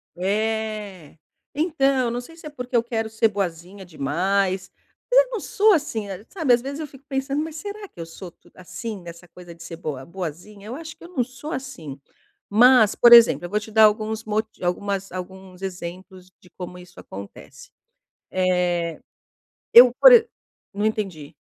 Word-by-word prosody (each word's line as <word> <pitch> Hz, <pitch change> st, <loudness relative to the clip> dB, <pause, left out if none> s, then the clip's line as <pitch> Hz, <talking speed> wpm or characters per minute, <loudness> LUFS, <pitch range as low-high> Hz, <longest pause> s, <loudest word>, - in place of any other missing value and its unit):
É, 210 Hz, -3 st, -3 dB, 0.4 s
então, 275 Hz, -5 st, +1 dB
não 240 Hz, +1 st, -3 dB
sei 325 Hz, +7 st, -14 dB
se 325 Hz, -, -14 dB
é -, -, -6 dB
porque 250 Hz, -3 st, -6 dB
eu 235 Hz, -, +4 dB
quero 225 Hz, -2 st, -3 dB
ser 220 Hz, +1 st, +2 dB
boazinha 190 Hz, -1 st, -5 dB
demais, 185 Hz, +5 st, -1 dB, 0.4 s
mas -, -, +7 dB
eu -, -, -5 dB
não 460 Hz, -, -3 dB
sou, 430 Hz, -2 st, +3 dB
assim, 230 Hz, -, -2 dB, 0.2 s
sabe, 310 Hz, -10 st, +2 dB
as 240 Hz, -, +3 dB
vezes 280 Hz, +4 st, -6 dB
eu 310 Hz, -, -5 dB
fico 275 Hz, 0 st, -17 dB
pensando: 275 Hz, +2 st, -2 dB
"Mas 320 Hz, -1 st, -7 dB
será 410 Hz, +3 st, -7 dB
que -, -, -20 dB
eu 165 Hz, -, -5 dB
sou 170 Hz, +2 st, -10 dB
tu -, -, -26 dB
assim, 205 Hz, +2 st, -7 dB
nessa 170 Hz, +1 st, -12 dB
coisa 175 Hz, 0 st, -13 dB
de 170 Hz, -, -13 dB
ser 170 Hz, -1 st, -8 dB
boa 145 Hz, -6 st, -6 dB
boazinha? 190 Hz, +4 st, -8 dB
Eu 240 Hz, -, -6 dB
acho 320 Hz, +2 st, -9 dB
que -, -, -17 dB
eu -, -, -10 dB
não 260 Hz, -9 st, 0 dB
sou, 265 Hz, +5 st, -9 dB
assim". 165 Hz, -, -7 dB, 0.5 s
Mas 235 Hz, 0 st, +6 dB
por 240 Hz, -, +6 dB
exemplo 225 Hz, -9 st, +8 dB
eu -, -, -6 dB
vou 210 Hz, +3 st, 0 dB
te 215 Hz, +1 st, -11 dB
dar 220 Hz, 0 st, +5 dB
alguns 215 Hz, +1 st, 0 dB
moti 215 Hz, -2 st, -3 dB
algumas 195 Hz, +2 st, -2 dB
alguns 185 Hz, 0 st, -9 dB
exemplos 185 Hz, 0 st, -8 dB
de 180 Hz, -, -20 dB
como 180 Hz, 0 st, -9 dB
isso 180 Hz, 0 st, -15 dB
acontece. 100 Hz, +1 st, -11 dB, 0.6 s
Eh, 180 Hz, -3 st, 0 dB, 0.7 s
eu 240 Hz, +1 st, +9 dB
por -, -, +10 dB
exe 465 Hz, -2 st, +7 dB, 0.5 s
Não 205 Hz, +1 st, -2 dB
entendi! 195 Hz, -9 st, -3 dB
210 Hz, 180 wpm, -23 LUFS, 180-255 Hz, 0.7 s, por